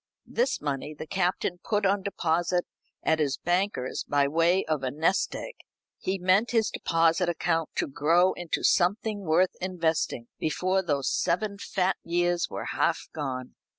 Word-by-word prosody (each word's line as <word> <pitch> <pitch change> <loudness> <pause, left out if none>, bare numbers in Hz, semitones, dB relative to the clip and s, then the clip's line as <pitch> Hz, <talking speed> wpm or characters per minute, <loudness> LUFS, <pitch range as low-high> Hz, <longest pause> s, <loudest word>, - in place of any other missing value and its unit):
This 250 +3 0
money 145 +1 -3
the 155 - -7
Captain 180 0 -1
put 210 -2 0
on 195 +1 +2
deposit 175 -2 0 0.4
at 160 0 +2
his 140 -3 +1
banker's, 175 -7 -1
by 145 -1 +2
way 165 +5 +2
of 155 -3 -1
a 130 - -1
nest 160 +8 +1
egg. - - -6 0.5
He 190 +1 -1
meant 185 +5 +3
his 225 -3 +2
deposit 165 +1 +2
account 165 -1 0
to - - +1
grow 165 +6 +3
into 175 -2 -3
something 205 +4 +2
worth 180 0 +2
investing 165 -9 -1
before 185 +5 +1
those 145 -7 -1
seven 200 +3 0
fat 190 -1 0
years 175 0 +1
were - - -5
half - - 0
gone. 130 -4 -4
175 Hz, 150 wpm, -27 LUFS, 155-190 Hz, 0.5 s, meant